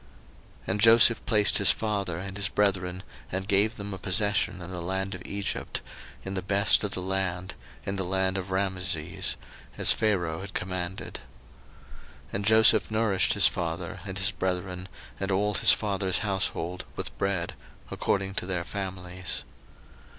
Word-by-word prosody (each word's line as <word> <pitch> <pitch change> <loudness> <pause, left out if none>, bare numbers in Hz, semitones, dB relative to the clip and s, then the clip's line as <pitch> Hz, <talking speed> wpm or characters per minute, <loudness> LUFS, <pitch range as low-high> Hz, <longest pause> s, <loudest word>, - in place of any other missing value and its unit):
01:047:011 - - -22
And 100 +2 -1
Joseph 115 +1 +7
placed 105 -2 +4
his 100 - +7
father 100 -6 0
and 95 +2 -6
his 100 -2 0
brethren, 95 -2 0 0.3
and 95 +1 -3
gave 105 +2 +2
them 100 -1 -6
a 95 - -6
possession 105 +1 +1
in 90 0 -8
the 90 -1 -5
land 95 +3 -2
of 90 - -8
Egypt, 100 0 -4 0.4
in 95 - -4
the 95 - -1
best 100 +3 +3
of 100 -2 -2
the 90 - -3
land, 95 -1 -1 0.3
in 100 0 -3
the 95 - -1
land 95 +1 0
of 95 -1 -4
Rameses, 95 -4 -1 0.4
as - - +5
Pharaoh 90 -7 0
had 100 +1 -9
commanded. 90 0 -4 1.1
01:047:012 - - -22
And 100 0 -2
Joseph 110 0 +6
nourished 110 -4 +2
his - - +7
father, - - -4
and - - -6
his - - +2
brethren, 90 0 -3 0.3
and 95 - -2
all 105 +2 +1
his - - +6
father's 95 -3 0
household, 90 -3 -2
with - - -6
bread, 95 -3 -1 0.4
according 95 -1 -1
to 90 - -4
their 90 -2 -1
families. 90 -1 -5
95 Hz, 160 wpm, -27 LUFS, 90-100 Hz, 1.1 s, Joseph